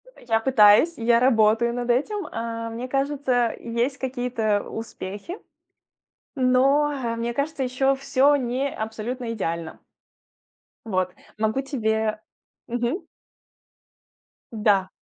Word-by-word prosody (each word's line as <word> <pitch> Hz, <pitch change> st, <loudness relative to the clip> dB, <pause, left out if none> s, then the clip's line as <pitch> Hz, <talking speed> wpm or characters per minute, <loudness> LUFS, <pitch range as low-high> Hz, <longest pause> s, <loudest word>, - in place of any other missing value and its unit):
Э, -, -, -18 dB
я 225 Hz, -1 st, +3 dB
пытаюсь, 225 Hz, +5 st, +5 dB
я 235 Hz, 0 st, +3 dB
работаю 235 Hz, -1 st, +3 dB
над 245 Hz, 0 st, -4 dB
этим. 360 Hz, -, 0 dB
А, 230 Hz, 0 st, -4 dB
мне 235 Hz, +3 st, -5 dB
кажется, 270 Hz, -3 st, 0 dB
есть 240 Hz, +4 st, -2 dB
какие-то 245 Hz, -5 st, -1 dB
успехи, 225 Hz, -, -7 dB, 1.0 s
но, 270 Hz, +3 st, +3 dB
ха, 230 Hz, -2 st, -2 dB
мне 235 Hz, +1 st, -2 dB
кажется, 285 Hz, +2 st, -2 dB
еще 270 Hz, +2 st, +1 dB
всё 275 Hz, +1 st, +3 dB
не 260 Hz, +1 st, -1 dB
абсолютно 230 Hz, +3 st, -4 dB
идеально. 170 Hz, -6 st, -4 dB, 1.1 s
Вот. 185 Hz, -4 st, -1 dB, 0.2 s
Могу 220 Hz, +4 st, 0 dB
тебе 220 Hz, -5 st, -1 dB, 0.5 s
Мгм. 240 Hz, -, -2 dB, 1.5 s
Да. 205 Hz, -4 st, +2 dB
240 Hz, 110 wpm, -24 LUFS, 220-265 Hz, 1.5 s, пытаюсь